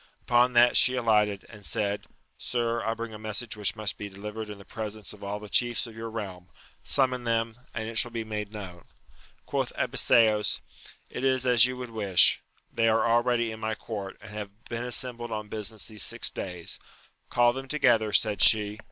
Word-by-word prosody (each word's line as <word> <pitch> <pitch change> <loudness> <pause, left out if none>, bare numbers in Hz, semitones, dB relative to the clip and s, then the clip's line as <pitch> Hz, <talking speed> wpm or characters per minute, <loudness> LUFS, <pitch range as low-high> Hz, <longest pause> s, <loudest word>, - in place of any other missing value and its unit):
Upon 125 +1 +3
that 120 0 +6
she 130 - +5
alighted, 105 -4 +2
and 105 -2 -14
said, 100 +1 -2 0.3
Sir, 120 -1 -1
I 115 +1 -1
bring 115 -1 -6
a 105 - -8
message 110 +2 -3
which 105 0 -1
must 110 -2 -3
be 105 - -5
delivered 105 +2 -7
in 105 - -7
the 100 - -14
presence 110 -2 -6
of - - -13
all 100 +1 -3
the 105 - -9
chiefs 120 +3 +1
of 115 -2 -11
your 115 0 -6
realm: 95 -5 -7 0.3
summon 130 -2 +1
them, 115 0 -1 0.2
and 110 -1 -3
it 115 -1 0
shall 120 - +2
be 115 -1 -4
made 105 -2 -5
known. 95 -5 -8 0.6
Quoth - - -1
Abiseos, 110 -2 +3 0.5
it - - -5
is 130 -1 +2
as 125 -1 +6
you 130 0 -5
would 125 -2 -7
wish: 100 -5 +4 0.3
they 115 -1 +3
are 110 +1 +3
already 120 0 +2
in 110 - -8
my 110 0 -2
court, 100 -4 -6
and 110 0 -11
have 105 +1 -8
been 115 0 -4
assembled 120 -1 -3
on 105 -1 -5
busi 105 -1 -2
ness 110 - -6
these 110 -3 -5
six - - +1
days. 90 -3 -6 0.5
Call 120 0 +4
them 135 +1 -6
together, 120 -7 +3
said 105 -2 +1
she. 105 -1 +5
110 Hz, 195 wpm, -28 LUFS, 105-120 Hz, 0.6 s, that